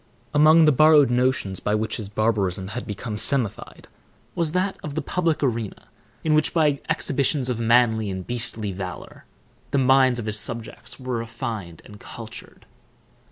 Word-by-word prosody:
Among 155 +2 +6
the 150 - +5
borrowed 150 -2 +5
notions 120 -6 0
by 105 - -1
which 110 +1 -2
his 105 -3 -7
barbarism 100 -3 -1
had 125 +4 -6
become 105 +1 -5
semified 120 -2 +1 0.5
was 165 -3 -1
that 185 +2 0
of 145 -1 -7
the 160 - -1
public 165 -1 -1
arena, 115 -6 -3 0.3
in 155 - +1
which, 155 +2 +1
by 150 -4 +2
exhibitions 140 -1 -1
of 120 - -3
manly 115 -2 +3
and 95 -1 -5
beastly 115 -3 -2
valor, 90 -1 -8 0.4
the 140 - 0
minds 130 -1 +4
of 120 - -5
his 110 -1 -1
subjects 115 +4 -7
were 130 -2 -3
refined 115 -7 -6
and 105 0 -13
cultured. 115 0 -11
120 Hz, 160 wpm, -23 LUFS, 105-140 Hz, 0.5 s, Among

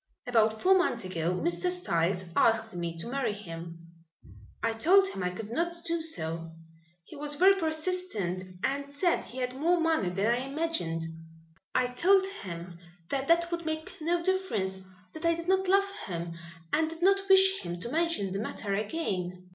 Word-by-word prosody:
About 220 -3 +2
four 380 +1 +6
months 245 - +1
ago 170 -2 -1
Mr. 345 - +1
Styles 185 - 0
asked 225 -1 +3
me 170 -1 -4
to 165 - -4
marry 250 -3 -1
him. 170 -4 -8 0.9
I 230 - +2
told 365 +13 +5
him 195 - -5
I 180 - 0
could 210 +4 -7
not 340 +5 -2
do 335 -1 0
so. 165 - -1 0.5
He 310 - -13
was 295 0 -4
very 375 +6 +6
persistent 310 - -2
and 280 +1 -1
said 335 +5 +1
he 250 - -11
had 250 -1 -2
more 340 +6 +2
money 320 - +2
than 195 +3 -1
I 235 +2 +3
imagined. 270 - -2 0.7
I 255 - +4
told 380 +10 +4
him 175 - -6 0.3
that 275 -1 -1
that 340 +1 +3
would 340 0 -2
make 315 0 -4
no 340 +2 0
difference, 210 - -1 0.3
that 315 - -8
I 335 0 +3
did 335 +1 -7
not 380 0 +2
love 395 +1 +3 0.2
him 170 -2 -4 0.4
and 315 0 +2
did 330 +1 -7
not 390 +1 +3
wish 385 0 +6
him 175 0 -5
to 235 - -3
mention 330 - 0
the 195 - -2
matter 210 -2 -3
again." 185 - -3
270 Hz, 175 wpm, -29 LUFS, -, 0.9 s, four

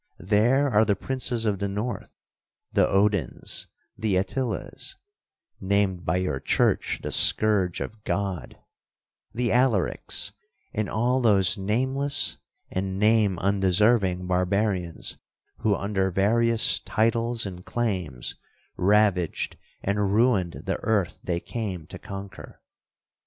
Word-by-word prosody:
There 115 +10 +2
are 110 -5 +4
the 105 -2 +2
princes 125 +1 -1
of 100 -3 0
the 100 - -1
North, 105 +2 -4 0.6
the - - +4
Odins, 100 - 0 0.3
the 110 -3 -1
Attilas, 120 +7 -2 0.6
(named 95 -2 0
by 90 - +1
your 90 -7 -1
church - - +1
the - - -3
scourge 100 -5 +3
of 110 -1 -7
God), 100 -5 -3 0.7
the 120 +1 -1
Alarics, 120 -6 +1 0.4
and 105 -3 -2
all 125 +4 +1
those 100 -5 +4
nameless 130 +8 +1 0.3
and 95 0 -2
name 105 -2 +3
undeserving 95 0 +2
barbarians, 90 -1 -1 0.4
who, 105 -2 +2
under 100 -1 -1
various 115 +5 +3
titles 115 +1 0
and 90 -2 -7
claims, 90 - -2 0.4
ravaged 100 -3 +2 0.3
and 100 0 0
ruined 110 -7 +1
the - - -1
earth 100 -6 0
they 85 -1 -1
came 95 -7 -5
to - - -10
conquer. 100 -2 -9
100 Hz, 115 wpm, -25 LUFS, 95-115 Hz, 0.7 s, are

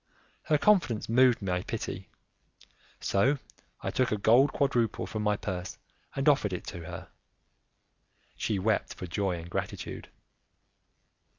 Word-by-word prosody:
Her 150 - +3
confidence 170 - +3
moved 125 -1 +4
my 90 -2 0
pity, - - -5 0.9
so 130 +9 +2 0.5
I - - -1
took 130 - +1
a 105 - +1
gold 120 +7 +5
quadruple 120 -6 +1
from 110 - -4
my 105 -1 +1
purse 95 -3 -5 0.4
and 135 +2 -1
offered 135 -10 +4
it 90 - -4
to 85 - -6
her; - - -8 1.3
she 105 - -1
wept 105 +3 0
for - - -6
joy 95 0 -1
and 85 0 -8
gratitude. 85 - -5
110 Hz, 130 wpm, -29 LUFS, 95-130 Hz, 1.3 s, gold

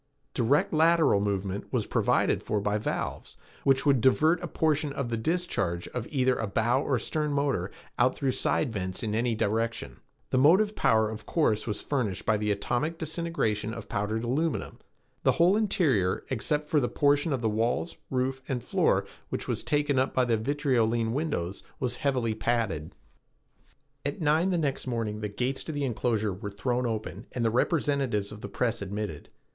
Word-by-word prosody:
Direct 130 +7 +2
lateral 160 -7 +4
movement 100 -1 -2
was - - 0
provided - - +2
for 105 - -1
by 105 +1 0
valves - - -4 0.3
which 135 0 +3
would 135 -4 +4
divert 155 +7 +4
a 175 - -3
portion 155 -3 0
of 135 -4 -3
the 115 - -1
discharge 110 - -1
of 120 -2 -4
either 130 -2 +2
a 110 - -2
bow 120 +6 +1
or 135 -3 +1
stern 150 +5 -2
motor 140 -10 0 0.3
out 125 +1 +3
through 135 -3 0
side 125 -1 0
vents 95 -1 -3
in 105 -2 -1
any 115 +1 +1
direction. 115 +2 -1 0.3
The 130 - +3
motive 190 +10 +5
power, 110 -1 +3
of 105 -1 -8
course, 110 -11 +1
was 105 - -3
furnished 120 -10 -2
by 110 - +3
the 105 0 -1
atomic 120 +10 -1
disintegration 155 -10 -2
of 115 -3 -8
powdered 105 +3 -2
aluminum. 145 +6 -1 0.4
The - - +3
whole 175 +4 +4
interior, 155 - +1
except 150 +4 0
for 150 0 +2
the 120 - 0
portion 145 +2 +2
of 135 -3 -1
the - - +3
walls, 115 +9 -1
roof 130 +1 -1
and 125 -3 -2
floor, - - +2 0.2
which - - -3
was - - -2
taken 145 -2 +1
up 130 - 0
by 130 - +3
vitriolene 120 -2 +1
windows, 120 - -2 0.2
was 125 -2 -1
heavily 125 -5 0
padded. 110 -9 -1 1.1
At 145 +1 -3
nine 160 +3 +2
the 180 - +1
next 140 -5 -1
morning 115 -4 -2
the 105 - -2
gates 125 +6 -2
to - - -4
the 145 -2 -2
enclosure 110 -4 0
were 100 +2 -6
thrown 120 +4 -1
open 110 -1 -4
and 120 -2 -1
the 115 - +2
representatives 135 - +1
of 105 0 -9
the 100 - -6
press 115 0 -1
admitted. 100 -5 -5
125 Hz, 175 wpm, -28 LUFS, 110-145 Hz, 1.1 s, motive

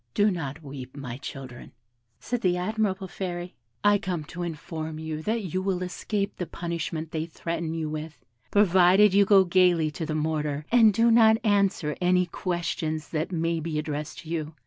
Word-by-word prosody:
'Do 205 0 +4
not 160 -3 -5
weep, 135 -1 -9
my 125 -4 -5
children,' 130 -3 -9 0.5
said 240 - -3
that 180 -2 +2
admirable 190 0 -1
fairy; 180 -1 -5 0.3
'I 205 0 +5
come 180 -6 -3
to 175 +4 -8
inform 160 -1 -5
you 155 -1 -5
that 220 +5 -1
you 185 - 0
will 185 -1 -1
escape 200 +2 -3
the 180 - -4
punishment 170 -2 -4
they 160 0 -2
threaten 165 0 -4
you 160 -1 -2
with, 155 0 -6 0.3
provided 190 0 +5
you 200 0 +5
go 195 -2 +6
gaily 175 -3 +3
to 160 - -5
the 155 -1 -2
mortar, 150 -1 -1
and 230 -3 +7
do 230 +3 +3
not 220 -1 +6
answer 200 -8 +1
any 180 0 +3
questions 165 -3 -3
that 160 +3 -2
may 165 -1 0
be 160 -1 -3
addressed 150 -1 -4
to 160 - -12
you. 160 -2 -3
170 Hz, 175 wpm, -26 LUFS, 155-190 Hz, 0.5 s, and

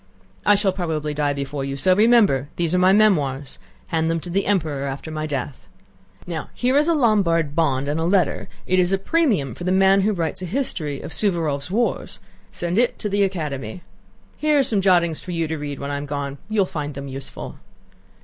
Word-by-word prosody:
"I 205 - +7
shall 200 -1 +2
probably 160 -5 -2
die 145 -1 0
before 140 0 -4
you. 135 0 -4
So 185 +7 +4
remember, 210 - +4
these 170 -1 0
are 180 - +3
my 185 +1 +5
memoirs; 145 -10 +2 0.3
hand 160 0 0
them 165 0 0
to 175 - -7
the 195 +2 0
Emperor 155 -8 0
after 140 +4 -6
my 155 0 -3
death. 140 -2 -5 0.6
Now 165 -3 -5
here 250 +2 +1
is 295 +2 +4
a 335 - +3
Lombard 175 - +2
bond 140 -4 +1
and 150 +2 -1
a 165 - 0
letter; 185 0 +1 0.2
it 185 0 +2
is 180 0 +2
a 195 - +3
premium 205 - +1
for - - -9
the 180 - 0
man 195 +1 +5
who 210 +3 +2
writes 170 -1 -2
a - - -3
history 165 - -2
of - - -7
Suvórov's 165 -7 0
wars. 230 +5 -1 0.3
Send 175 +4 -1
it 245 - +2
to 210 - -3
the 200 +1 +1
Academy. 155 - -3 0.5
Here 305 -1 +2
are 280 - +4
some 215 -6 +1
jottings 175 -4 +3
for 180 - -6
you 165 -1 -1
to 160 - -2
read 145 -2 -5
when 140 +1 -5
I 145 - -2
am 145 +1 -5
gone. 140 -1 -4
You 215 -1 +2
will - - +3
find 150 -5 -5
them 140 0 -6
useful." 135 0 -7
170 Hz, 215 wpm, -22 LUFS, 145-195 Hz, 0.6 s, I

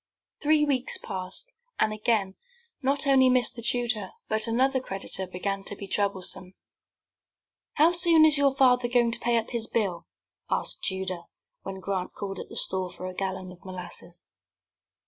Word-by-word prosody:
Three 300 0 +4
weeks 265 -3 +2
passed, 190 - -4 0.3
and 215 0 +2
again 215 -3 +1 0.5
not 275 +2 +1
only 265 -2 +6
Mr. 250 -1 +2
Tudor, 235 -4 0 0.2
but 220 +1 +1
another 260 +4 +2
creditor, 195 -5 -3
began 195 +2 -3
to 205 - -1
be 200 - -7
troublesome. 190 -2 -2 1.2
"How 315 +3 +5
soon 340 -2 +5
is 310 -1 +5
your 280 -2 +3
father 250 -2 +4
going 240 -1 +3
to 235 - -2
pay 240 0 +2
up 225 - -2
his 230 -2 -2
bill?" 195 -7 -1 0.4
asked - - -2
Tudor, 190 -2 -3 0.4
when 195 0 -6
Grant 190 -2 -3
called 195 -2 -5
at - - -8
the - - -10
store 185 -1 -1
for 185 - -8
a 185 - -5
gallon 185 -1 -4
of 180 - -15
molasses. 175 -2 -9
215 Hz, 160 wpm, -27 LUFS, 190-255 Hz, 1.2 s, only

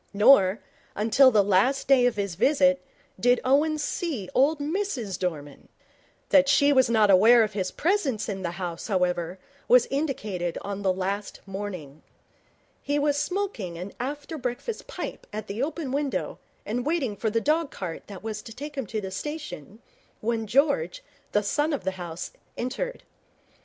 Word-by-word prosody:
Nor, 205 -3 +6 0.4
until 225 +6 +5
the 210 -5 +4
last 205 +8 +2
day 255 -2 +5
of 245 - 0
his 200 -3 -2
visit, 275 - +3 0.4
did 245 0 +4
Owen 295 +4 +3
see 295 - -3
old 290 +4 +3
Mrs 285 - -2
Dorman. 150 -6 -5 0.6
That 280 -1 +5
she 285 0 +5
was 260 -3 +4
not 215 -3 +4
unaware 225 +5 +7
of 215 -1 -3
his 190 -2 -1
presence 320 - 0
in 195 -3 -4
the 170 -2 -3
house, 175 -3 -5
however, 180 -3 0 0.3
was 250 -1 +6
indicated 215 - -2
on 200 0 -4
the 190 -2 +2
last 195 +2 -3
morning. 190 -7 -7 0.8
He 290 0 -1
was 290 0 +2
smoking 295 - -2
an 185 +3 -7
after 290 +4 -5
breakfast 250 - -4
pipe - - -6
at 215 0 -5
the 210 +3 -4
open 300 -1 -3
window 280 0 -2 0.3
and 245 +3 -2
waiting 285 -7 -1
for 220 +2 -1
the 230 +2 +1
dog 305 +4 +1
cart 175 -4 -7
that 200 -2 -10
was 215 -1 -4
to 225 0 -11
take 290 +3 -7
him 270 -6 -4
to 215 +2 -3
the 190 -1 -6
station, 235 - -7 0.4
when 225 0 -1
George, 245 - +1 0.3
the 210 - +2
son 295 +9 0
of 285 - -3
the 190 - 0
house, 170 0 -6 0.3
entered. - - -4
230 Hz, 165 wpm, -26 LUFS, 195-285 Hz, 0.8 s, unaware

